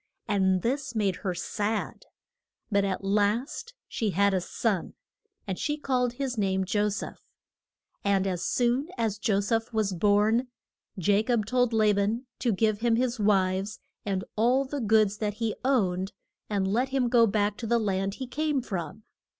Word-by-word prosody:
And 190 -3 +2
this 260 0 -2
made 200 -4 +1
her 185 -3 -3
sad. 210 +5 -3 0.6
But 200 -1 +3
at 195 0 -2
last 215 - 0
she 220 - -1
had 200 +2 +2
a 185 - +1
son, 190 0 -2 0.5
and 190 -3 -4
she 295 -1 -1
called 250 -4 0
his 255 -2 -3
name 190 -1 +1
Jo 205 +3 +1
seph. 200 - -5 0.8
And 195 -1 +2
as 180 -3 -2
soon 250 +5 +1
as 215 -3 -1
Jo 205 -2 +1
seph 225 +3 -1
was 215 -4 0
born 210 +6 +3 0.5
Ja 200 +2 +2
cob 225 -2 0
told 245 +1 +2
La 215 -2 +4
ban 210 +5 0
to 245 - +1
give 215 +1 +1
him 230 0 +2
his 245 0 0
wives 195 0 +1 0.2
and 190 -2 -1
all 250 +5 +3
the 280 +1 -4
goods 215 -2 +3
that 210 -1 -2
he 225 -1 -1
owned, 195 -8 +1 0.4
and 200 -2 0
let 240 +7 +1
him 265 -2 +1
go 235 -1 +5
back 205 0 +1
to 230 - -5
the 235 +1 +3
land 195 -2 -1
he 260 - -5
came 300 +2 -1
from. 190 +1 -5
215 Hz, 170 wpm, -27 LUFS, 195-240 Hz, 0.8 s, go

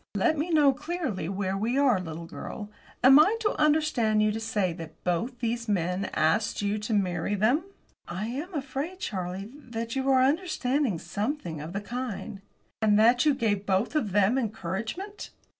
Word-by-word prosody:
"Let 205 +10 +2
me 310 +3 -2
know, 295 -4 +5
clearly, 290 - -3
where 195 -1 -2
we 225 +6 0
are, 265 -8 +4
little 165 -2 -6
girl. 205 +4 -7 0.3
Am 270 +3 +9
I 400 +9 +5
to 425 - +1
understand 295 -9 +3
you 215 - +3
to 220 - -3
say 205 -5 0
that 165 -1 -10
both 180 +9 -1
these 235 -1 -2
men 180 0 0
asked 205 +7 +1
you 205 +1 0
to 210 +2 -3
marry 185 0 0
them?" 240 - +2 0.4
"I 185 +5 -4
am 280 - -4
afraid, 280 +5 -4
Charlie, 190 - -4
that 230 -5 -6
you 270 0 0
are 265 -1 +5
to 260 - +5
understand 280 - 0
something 200 - -3
of 160 +4 -7
the 200 - -2
kind." 225 -3 -5 0.4
"And 210 -1 +4
that 240 +6 +5
you 290 - +4
gave 205 -6 0
both 195 +6 +1
of 245 -10 0
them 205 +6 +3
encouragement?" 220 - -4
225 Hz, 175 wpm, -27 LUFS, 195-275 Hz, 0.4 s, Am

